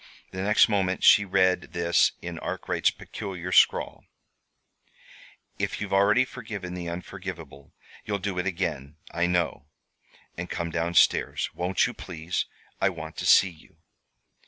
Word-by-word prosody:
The 95 - -5
next 105 +2 +5
moment 95 -3 0
she 105 - +7
read 95 -1 +1
this 85 0 +2
in - - -6
Arkwright's - - -1
peculiar 90 -4 -7
scrawl: 85 - +3 1.6
"If - - -2
you've 100 -1 -4
already 105 +6 +4
forgiven 95 -7 -7
the 90 -1 -5
unforgivable, 85 -5 -8 0.3
you'll 105 - -2
do 95 -1 -3
it 90 - -1
again, 80 -6 -3 0.2
I 85 +1 0
know, 90 -5 -1 0.7
and 85 +1 -6
come 85 -1 -3
down 85 +1 -2
stairs. - - +3
Won't 90 +1 +1
you, - - -3
please? 85 0 -4 0.3
I 95 - +4
want 80 -3 -8
to - - -3
see 95 - +6
you." 80 - -20
90 Hz, 140 wpm, -26 LUFS, 85-95 Hz, 1.6 s, she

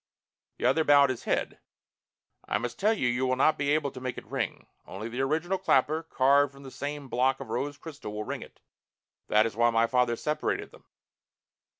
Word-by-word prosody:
The - - -3
other 160 - +3
bowed 140 -2 +6
his 130 - -7
head. - - -1 0.9
"I - - +1
must 120 +2 -5
tell 210 +2 +3
you," 220 - -6
he 125 - +2
said, - - -1
"you 130 0 0
will 130 - +2
not 145 +4 +3
be 140 -1 0
able 145 -2 +1
to 130 - -10
make 130 -1 -4
it - - -8
ring. - - -4 0.2
Only 100 +4 -6
the 125 +3 -3
original 160 +7 0
clapper, 155 -3 +2
carved 140 -2 +3
from 140 0 -14
the 135 - -9
same 145 0 -5
block 130 +2 +1
of - - -8
rose 145 0 -2
crystal, 145 -9 -8
will 105 0 -4
ring - - -5
it. - - -13 0.7
That 105 +1 +4
is 115 - -3
why 120 +1 +4
my 115 0 +3
father 125 -1 +2
separated 150 +5 -2
them." - - -18
135 Hz, 215 wpm, -28 LUFS, 120-145 Hz, 0.9 s, bowed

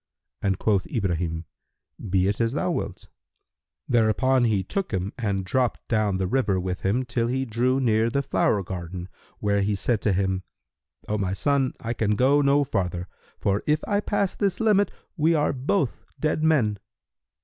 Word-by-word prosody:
And 95 -2 +1
quoth 100 -2 +1
Ibrahim, 85 -6 -2 0.6
"Be 95 0 +2
it 100 +3 0
as 115 +1 +1
thou 150 +4 0
wilt." 100 - -4 0.8
Thereupon 120 +2 +3
he 105 -4 +1
took 195 - -2
him 95 +1 -2
and 100 -5 -2
dropped 125 +5 0
down 110 -4 +1
the 95 - 0
river 105 -3 +1
with 90 0 -3
him 120 +7 0
till 120 -1 -1
he 130 +2 -1
drew 125 +3 +1
near 115 -3 +2
the 140 +4 0
flower 105 -6 +1
garden, 90 0 -6 0.3
when 100 -1 +1
he 100 +1 +1
said 110 +3 0
to 105 - +2
him, 95 0 0 0.7
"O 105 0 -1
my 95 -1 -1
son, 140 +4 +1
I 115 +1 -3
can 105 -2 +1
go 135 +6 +4
no 140 +1 +4
farther; 90 -8 -2 0.3
for, 100 +1 0
if 150 +1 +2
I 205 -1 +2
pass 200 -2 0
this 200 -3 -1
limit, 205 -3 +3 0.3
we 160 +2 +3
are 150 -1 +2
both 140 - -1 0.2
dead 155 0 0
men." 120 -11 +2
110 Hz, 170 wpm, -25 LUFS, 95-135 Hz, 0.8 s, go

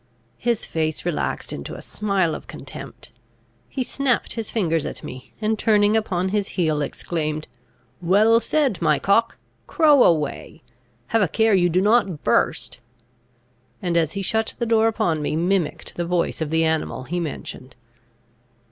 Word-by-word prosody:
His 235 -2 0
face 155 -1 -2
relaxed 175 -3 -2
into - - -6
a - - -9
smile 195 -6 0
of - - -7
contempt; - - -10 0.6
he 265 - -2
snapped 265 0 0
his 225 -2 -4
fingers 165 -8 0
at - - -7
me; 130 0 -9
and, 215 0 0
turning 210 -1 +3
upon 190 -4 0
his 205 0 0
heel, 155 -4 +1
exclaimed, 155 +1 -3 0.5
"Well 210 +6 +4
said, 270 - 0
my - - +3
cock! 225 +4 +2 0.3
crow 300 -5 +5
away! 155 0 0 0.5
Have 225 - +2
a 200 - +3
care 220 +5 +2
you 175 -2 +4
do 180 +2 +2
not 200 -6 +2
burst!" - - 0 1.0
and, 175 -2 -2
as 160 -2 +2
he 200 -1 -3
shut 220 +3 -1
the 235 - -1
door 225 -1 +3
upon 180 -9 0
me, 150 - -1
mimicked 175 0 -1
the 175 - -1
voice 170 -1 -1
of 155 - -1
the 160 +1 +2
animal 160 -4 -1
he 175 +7 -3
mentioned. 135 -5 -6
185 Hz, 155 wpm, -22 LUFS, 160-220 Hz, 1.0 s, crow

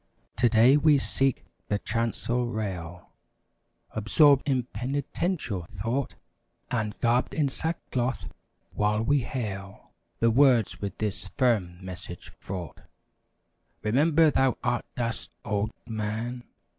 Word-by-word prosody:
Today 120 +3 +5
we 150 0 +5
seek 135 -1 0 0.2
the 105 - +1
chancel 115 +3 -1
rail, 90 -6 -5 0.8
Absorbed 135 +7 +4
in 130 -2 +2
penitential 135 - -2
thought; 115 +7 -2 0.6
And 110 -3 -2
garbed 120 +1 +2
in 150 -3 +2
sack 160 +4 -2
cloth, 125 0 -1 0.5
while 105 +1 +1
we 145 +5 +3
hail 100 -6 -5 0.3
The 115 0 +4
words 125 -3 +4
with 100 -2 -4
this 105 -3 -3
firm 110 -10 +2
message 90 -1 -8
fraught: 90 -5 -7 1.0
"Remember 150 +8 +4
thou 130 -3 +2
art 120 0 0
dust, 115 -3 -3 0.2
O, 105 +1 0 0.2
man!" 115 +2 -4
115 Hz, 110 wpm, -27 LUFS, 105-135 Hz, 1.0 s, Today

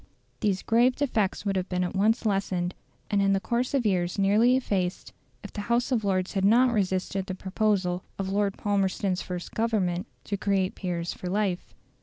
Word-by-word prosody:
These 195 -3 0
grave 240 +2 +3
defects 220 -9 0
would 195 -1 0
have 185 0 -1
been 180 0 0
at 180 - -3
once 220 +4 +2
lessened, 190 -3 0 0.4
and 200 -1 +3
in 195 0 +3
the 195 - +2
course 240 +6 -1
of 255 -4 +1
years 180 -3 +1
nearly 210 +6 +4
effaced, 190 -8 -2 0.3
if - - -9
the 205 - -4
House 240 +3 +1
of 235 -4 +1
Lords 185 -2 0
had 195 -2 0
not 240 +5 +5
resisted 190 -1 -1
the 185 - -3
proposal 190 -2 0
of 195 - -2
Lord 200 0 0
Palmerston's 195 -2 0
first 180 -1 -6
Government 210 -4 0 0.2
to 200 - -3
create 195 -2 0
peers 175 -2 -3
for 180 - -6
life. 195 -2 -1
195 Hz, 185 wpm, -27 LUFS, 185-215 Hz, 0.4 s, not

